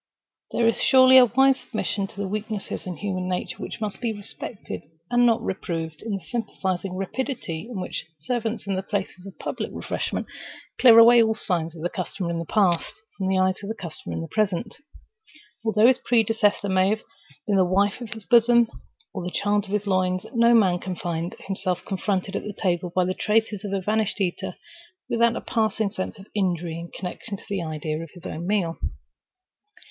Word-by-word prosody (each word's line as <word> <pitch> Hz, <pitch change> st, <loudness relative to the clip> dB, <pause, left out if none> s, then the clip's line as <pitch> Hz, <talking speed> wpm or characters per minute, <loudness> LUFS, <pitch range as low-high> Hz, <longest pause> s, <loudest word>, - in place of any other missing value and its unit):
There 235 Hz, -, +2 dB
is 230 Hz, -, +1 dB
surely 260 Hz, 0 st, +8 dB
a 250 Hz, -, +7 dB
wise 265 Hz, +2 st, +4 dB
submission 210 Hz, -4 st, -2 dB
to -, -, -16 dB
those 200 Hz, -, -2 dB
weaknesses 215 Hz, -2 st, -4 dB
in 180 Hz, -, -4 dB
human 185 Hz, 0 st, -3 dB
nature 180 Hz, 0 st, -3 dB
which -, -, -6 dB
must 215 Hz, -1 st, -4 dB
be 235 Hz, -2 st, 0 dB
respected 205 Hz, +1 st, -7 dB, 0.3 s
and 245 Hz, 0 st, +5 dB
not 230 Hz, -1 st, +2 dB
reproved, 165 Hz, -5 st, -4 dB
in 225 Hz, -, -4 dB
the 190 Hz, -, -12 dB
sympathizing 190 Hz, -3 st, -3 dB
rapidity 195 Hz, -, -3 dB
with 240 Hz, -, -6 dB
which 180 Hz, -2 st, -4 dB
servants 225 Hz, +7 st, -2 dB
in 195 Hz, -1 st, -1 dB
places 195 Hz, -1 st, -4 dB
of 195 Hz, -, -11 dB
public -, -, -4 dB
refreshment -, -, -3 dB, 0.5 s
clear 235 Hz, -3 st, +8 dB
away 235 Hz, +1 st, +9 dB
all 220 Hz, -1 st, +2 dB
signs 170 Hz, -6 st, -1 dB
of 160 Hz, -, -8 dB
the -, -, +2 dB
customer 185 Hz, -1 st, -3 dB
in 170 Hz, -, -2 dB
the 165 Hz, -, -4 dB
past, 185 Hz, -6 st, +2 dB, 0.2 s
from 190 Hz, -, -2 dB
the 190 Hz, 0 st, +2 dB
eyes 185 Hz, +1 st, +2 dB
of 200 Hz, -, -6 dB
the 220 Hz, -, -2 dB
customer 155 Hz, -, -6 dB
in 80 Hz, -, -3 dB
the 80 Hz, -, -5 dB
present. 215 Hz, +1 st, -1 dB, 0.9 s
Although 220 Hz, -1 st, +3 dB
his 255 Hz, +1 st, +6 dB
predecessor 225 Hz, -3 st, +2 dB
may 190 Hz, 0 st, +3 dB
have 215 Hz, +1 st, -1 dB, 0.4 s
been 205 Hz, -2 st, +2 dB
the 190 Hz, -, +6 dB
wife 200 Hz, +5 st, +1 dB
of 235 Hz, -, -6 dB
his 220 Hz, -3 st, -8 dB
bosom 235 Hz, -1 st, +5 dB, 0.4 s
or -, -, -4 dB
the 180 Hz, -, -3 dB
child 205 Hz, +2 st, 0 dB
of -, -, -13 dB
his 210 Hz, +1 st, -1 dB
loins, 185 Hz, -1 st, +1 dB
no 235 Hz, 0 st, +5 dB
man 185 Hz, -6 st, +4 dB
can 185 Hz, 0 st, -4 dB
find 170 Hz, -1 st, -3 dB
himself 185 Hz, -2 st, -3 dB
confronted 195 Hz, 0 st, -1 dB
at 210 Hz, 0 st, -4 dB
table 175 Hz, -2 st, 0 dB
by 185 Hz, -1 st, +3 dB
the 185 Hz, -, 0 dB
traces 215 Hz, 0 st, 0 dB
of 205 Hz, -, -4 dB
a 195 Hz, -, 0 dB
vanished 215 Hz, +2 st, 0 dB
eater, 180 Hz, -3 st, -2 dB, 0.5 s
without 235 Hz, 0 st, +3 dB
a -, -, -3 dB
passing 220 Hz, -2 st, 0 dB
sense 190 Hz, +2 st, -4 dB
of 195 Hz, -, -12 dB
injury 175 Hz, -4 st, -1 dB
in 170 Hz, 0 st, -8 dB
connection 195 Hz, +3 st, -6 dB
with -, -, -17 dB
the 200 Hz, -3 st, -2 dB
idea 155 Hz, -1 st, -3 dB
of 165 Hz, -, -8 dB
his 175 Hz, -, -13 dB
own 170 Hz, +3 st, -5 dB
meal. 190 Hz, -5 st, 0 dB
200 Hz, 195 wpm, -25 LUFS, 180-220 Hz, 0.9 s, away